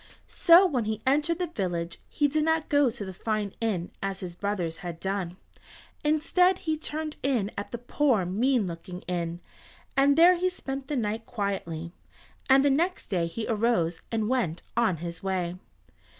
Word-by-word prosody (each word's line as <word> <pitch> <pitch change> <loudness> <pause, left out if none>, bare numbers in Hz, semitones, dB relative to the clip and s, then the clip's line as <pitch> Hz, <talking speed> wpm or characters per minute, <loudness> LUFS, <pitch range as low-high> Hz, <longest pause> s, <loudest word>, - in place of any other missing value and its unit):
So 345 +2 +6
when 260 - 0
he 215 0 -3
entered 300 +5 +2
the 360 - 0
village 175 - -3
he 290 - +2
did 305 +2 +1
not 320 0 +1
go 285 -3 +4
to 225 -3 -5
the 190 - -7
fine 210 0 -2
inn 195 -6 -1
as 195 -1 -3
his 180 -2 -5
brothers 175 -4 -2
had 170 -2 -7
done. 190 -2 -3 0.7
Instead 330 +5 +3
he 315 -1 +1
turned 310 0 -4
in 240 -7 0
at 200 - -5
the 240 - -4
poor, 245 -4 +1
mean 230 +5 +2
looking 180 +1 -7
inn, 170 -1 -3 0.5
and 280 +1 +4
there 350 +2 +7
he 365 +1 +1
spent 270 -7 -6
the 295 - -2
night 220 0 -2
quietly, 175 -6 -3 0.6
and 270 +1 +6
the 285 - +5
next 340 - 0
day 175 -3 +1
he 220 +7 -4
arose, 215 -7 +1
and 220 -2 0
went 225 -10 0
on 225 -7 +2
his 170 +1 -6
way. 185 -3 -1
220 Hz, 175 wpm, -27 LUFS, 180-285 Hz, 0.7 s, there